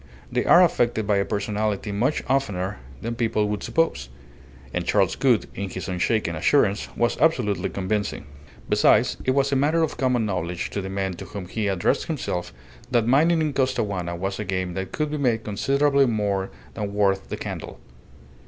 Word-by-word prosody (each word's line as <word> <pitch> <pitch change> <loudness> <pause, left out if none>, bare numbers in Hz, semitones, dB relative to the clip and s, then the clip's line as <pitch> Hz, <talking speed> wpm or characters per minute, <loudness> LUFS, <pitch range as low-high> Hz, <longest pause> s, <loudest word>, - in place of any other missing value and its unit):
They - - 0
are 180 - +7
affected 120 - +1
by 105 -1 +2
a 100 - +1
personality 105 0 -2
much 120 +9 0
oftener 100 -8 -1 0.2
than 115 +1 -2
people 115 -3 0
would 105 -1 -2
suppose; 70 - 0 0.6
and 90 - -1
Charles 95 0 +2
Gould, 125 -5 +3
in 100 -1 -4
his 95 - -6
unshaken 90 -1 0
assurance, 100 - +2
was 120 0 +1
absolutely 110 - +2
convincing. 100 -1 -2 0.4
Besides, - - +4
it 130 - +2
was 140 0 +2
a - - +2
matter 155 +5 +2
of 160 - -2
common 125 -3 +1
knowledge 90 -3 -3
to 100 - -2
the 95 - -5
men 95 -1 -2
to - - -7
whom 100 -3 -7
he 105 +2 -2
addressed 95 -3 +1
himself 105 - -3 0.4
that 120 -3 +2
mining 160 +7 +4
in 155 -2 0
Costaguana 100 -10 -1
was 95 +3 -3
a - - -1
game 95 -2 -2
that 95 0 -4
could 150 -1 -2
be 150 - -2
made 120 -5 +1
considerably 140 +6 +2
more 100 -4 0 0.2
than 100 -2 -4
worth 100 -2 +1
the - - -4
candle. - - -6
105 Hz, 180 wpm, -24 LUFS, 95-130 Hz, 0.6 s, are